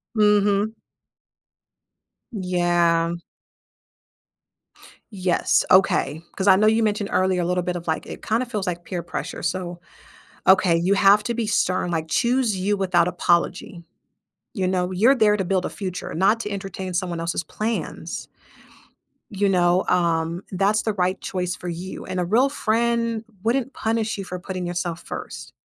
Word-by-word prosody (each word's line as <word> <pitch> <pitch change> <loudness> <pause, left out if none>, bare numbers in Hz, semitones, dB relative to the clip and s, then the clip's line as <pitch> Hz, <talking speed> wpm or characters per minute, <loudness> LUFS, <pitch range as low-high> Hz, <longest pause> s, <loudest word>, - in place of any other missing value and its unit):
Mhm. 210 0 +3 1.6
Yeah. 175 -3 +1 2.0
Yes. 185 -2 +1
Okay, 160 -5 +3 0.2
'cause 190 - -1
I 190 - +8
know 215 +2 +3
you 225 +1 +3
mentioned 205 -1 -1
earlier 185 -1 +2
a - - -1
little 180 0 0
bit 180 0 -2
of, 170 -1 -6
like 160 -1 -2
it - - -9
kinda 230 +4 +1
feels 210 -5 -3
like 175 -2 -4
peer 175 -3 -4
pressure - - -5
so, 175 0 -3 0.7
okay, 185 -2 +5
you 180 +4 +2
have 200 +1 +5
to 235 - -2
be 230 -1 -2
stern, 185 -3 0
like, 160 -2 -2
choose 240 +1 +1
you 200 +3 0
without 180 -3 +2
apology, 175 0 0 0.7
you 190 -6 -1
know, 180 0 0
you're 225 +9 +4
there 210 -4 +3
to 190 - -1
build 185 0 0
a - - -2
future, 185 -3 -5
not 195 +6 +3
to 210 - -5
entertain 190 -2 -5
someone 175 -2 -2
else's 170 +1 -2
plans. 220 +6 -4 1.0
You 200 0 0
know, 180 0 +3
um, 170 0 0
that's 200 +3 +2
the 220 - -1
right 185 0 0
choice 180 -2 -3
for 180 - -7
you, 175 +3 -6
and 185 - -3
a 175 - 0
real 240 +9 +3
friend 230 -2 0 0.2
wouldn't 250 +3 0
punish 225 -1 -1
you 195 - -5
for 180 0 -6
putting 185 0 -5
yourself 175 -1 -3
first. - - -7
185 Hz, 155 wpm, -23 LUFS, 175-210 Hz, 2.0 s, I